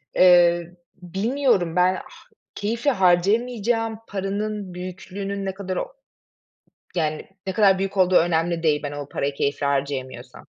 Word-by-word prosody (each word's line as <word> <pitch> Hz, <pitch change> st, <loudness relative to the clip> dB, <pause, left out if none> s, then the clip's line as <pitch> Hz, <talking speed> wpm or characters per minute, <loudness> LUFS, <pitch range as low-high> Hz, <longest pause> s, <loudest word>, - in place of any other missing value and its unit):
eee, 175 Hz, -1 st, +5 dB, 0.3 s
bilmiyorum 195 Hz, -1 st, 0 dB
ben, 180 Hz, +1 st, +3 dB
ha -, -, -6 dB, 0.5 s
keyifle 230 Hz, +7 st, 0 dB
harcayamayacağım 225 Hz, +4 st, +1 dB
paranın 200 Hz, 0 st, -3 dB
büyüklüğünün 190 Hz, +2 st, -6 dB
ne 190 Hz, -, -2 dB
kadar 190 Hz, -1 st, -5 dB
o -, -, -4 dB, 1.0 s
yani, 155 Hz, -2 st, -1 dB, 0.2 s
ne 190 Hz, -, -1 dB
kadar 195 Hz, -1 st, +4 dB
büyük 195 Hz, +1 st, -3 dB
olduğu 185 Hz, -1 st, +4 dB
önemli 170 Hz, 0 st, +2 dB
değil, 150 Hz, -2 st, +2 dB
ben 145 Hz, -1 st, -4 dB
o 145 Hz, -1 st, -6 dB
parayı 140 Hz, 0 st, -2 dB
keyifle 140 Hz, 0 st, -1 dB
harcayamıyorsam. 140 Hz, -2 st, -3 dB
185 Hz, 130 wpm, -23 LUFS, 170-205 Hz, 1.0 s, eee